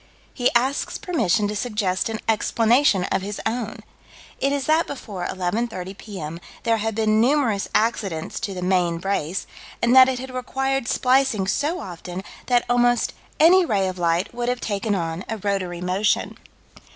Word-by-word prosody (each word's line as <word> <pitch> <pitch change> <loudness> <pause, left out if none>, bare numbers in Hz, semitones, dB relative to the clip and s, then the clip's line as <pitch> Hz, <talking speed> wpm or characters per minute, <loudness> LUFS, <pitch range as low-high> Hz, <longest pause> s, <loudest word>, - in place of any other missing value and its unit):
'" - - -31
He 245 -1 +2
asks 260 +4 +1
permission 220 - +1
to 210 - -3
suggest 210 -4 -1
an 220 -1 -3
explanation 225 0 +3
of - - +1
his 200 +1 -5
own. 225 -1 -3 0.6
It 275 - +1
is 280 -2 -1
that 315 +2 +3
before 205 -10 -5
11:30 190 0 -3
P.M. 170 -6 -7 0.2
there 230 -1 +2
had 220 0 -2
been 215 0 +2
numerous 245 -6 +2
accidents 205 -7 0
to 195 - -4
the 180 - -4
"main 180 -2 +1
brace," 185 -1 -2 0.3
and 235 +2 +3
that 260 0 +9
it 260 - -1
had 260 +1 -7
required 265 0 -1
splicing 255 -7 +2
so 295 - 0
often 180 +1 -7 0.2
that 245 -1 +3
almost 245 -1 +2 0.3
any 360 +4 +7
ray 200 - +1
of 185 -1 -5
light 170 +4 0
would 240 0 -2
have 250 0 -1
taken 205 -1 -1
on 165 0 -3
a 225 - -2
rotary 185 -4 -2
motion. 190 +4 0
220 Hz, 165 wpm, -23 LUFS, 190-250 Hz, 0.6 s, that